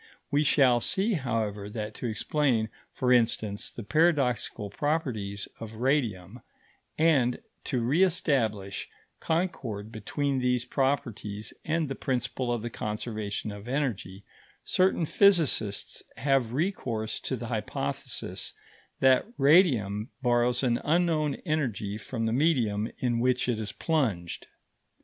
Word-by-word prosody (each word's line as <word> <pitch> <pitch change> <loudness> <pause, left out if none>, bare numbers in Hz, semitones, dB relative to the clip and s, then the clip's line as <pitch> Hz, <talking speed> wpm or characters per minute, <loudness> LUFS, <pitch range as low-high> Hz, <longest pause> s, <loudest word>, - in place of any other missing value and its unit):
We 145 +1 +3
shall 130 -4 +5
see, 195 - 0
however, 110 - -2
that 105 0 -5
to 125 - -3
explain, 115 0 +1 0.2
for 125 -1 +2
instance, 110 -4 +1
the 120 - -8
paradoxical 125 - +1
properties 110 -9 -2
of 110 -1 -7
radium 120 - 0 0.6
and 140 -7 +3 0.3
to 125 - 0
re 135 +10 +2
establish 120 - +1 0.3
concord 150 - -2
between 135 +5 -1
these 125 -1 +1
properties 115 -7 -2
and 160 0 0
the 135 - -3
principle 125 -1 -2
of 120 -2 -1
the 120 - -4
conservation 105 -1 -3
of 100 +2 -9
energy, 115 -8 -2 0.4
certain 185 -2 +2
physicists 155 - +2 0.2
have 135 -4 +2
recourse 125 - -2
to 130 - -3
the 120 -1 -6
hypothesis 110 -2 -3 0.5
that 130 +7 +5
radium 125 - +4
borrows 120 +1 +2
an 120 -2 +1
unknown 155 -3 +2
energy 115 - -1
from 115 0 -3
the 110 - 0
medium 120 -7 +2
in 120 -2 0
which 125 +1 +2
it 120 -3 0
is 105 -1 -3
plunged. 115 - -1
125 Hz, 120 wpm, -28 LUFS, 110-145 Hz, 0.6 s, shall